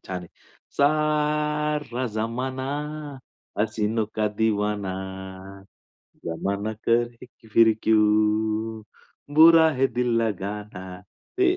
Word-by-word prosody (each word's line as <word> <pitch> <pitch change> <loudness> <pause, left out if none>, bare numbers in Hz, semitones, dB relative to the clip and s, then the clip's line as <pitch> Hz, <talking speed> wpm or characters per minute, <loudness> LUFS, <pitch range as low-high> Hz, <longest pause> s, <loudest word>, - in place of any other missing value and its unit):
छान 95 -1 -3
आहे. 85 - -12 0.5
सारा 150 -2 +1
जमाना, 130 +4 -3 0.9
हसीनो 110 0 0 0.3
दीवाना, 105 -3 0 1.3
जमाना 100 +6 -2 0.2
कहे 120 +1 +1 0.2
फिर 110 0 +5
क्यू 110 -1 +4 1.4
बुरा 160 0 +8
है 135 -2 +2
दिल 125 0 +2
लगाना. 100 -3 -5 0.4
ते 370 -1 +3
115 Hz, 80 wpm, -24 LUFS, 105-150 Hz, 1.4 s, बुरा